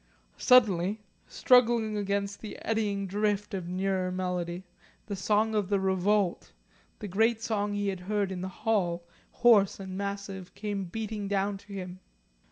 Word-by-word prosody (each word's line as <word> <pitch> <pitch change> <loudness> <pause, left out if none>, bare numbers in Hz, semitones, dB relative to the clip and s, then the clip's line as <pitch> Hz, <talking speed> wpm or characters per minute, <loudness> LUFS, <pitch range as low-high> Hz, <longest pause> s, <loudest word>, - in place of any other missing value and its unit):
Suddenly, 210 -4 +4 0.2
struggling 235 -3 +3
against 200 0 -2
the 215 - -7
eddying 210 -3 0
drift 205 +2 -1
of 185 -3 -3
nearer 185 0 -1
melody, 180 -1 -3 0.4
the 205 - -4
song 215 +3 +1
of 205 -3 0
the 200 -1 +2
Revolt, 190 0 +1 0.4
the 210 - -6
great 220 +4 +2
song 205 -3 -1
he 205 -1 -1
had 190 -2 -3
heard 200 +1 -1
in 180 -1 -4
the 190 - -4 0.2
Hall, 175 -6 +1 0.2
hoarse 210 -6 +4
and 190 -1 -6
massive, 200 -2 -5
came 205 -2 -3
beating 210 +2 -4
down 200 0 0
to 205 0 -13
him. 185 -1 -6
200 Hz, 150 wpm, -29 LUFS, 190-210 Hz, 0.4 s, Suddenly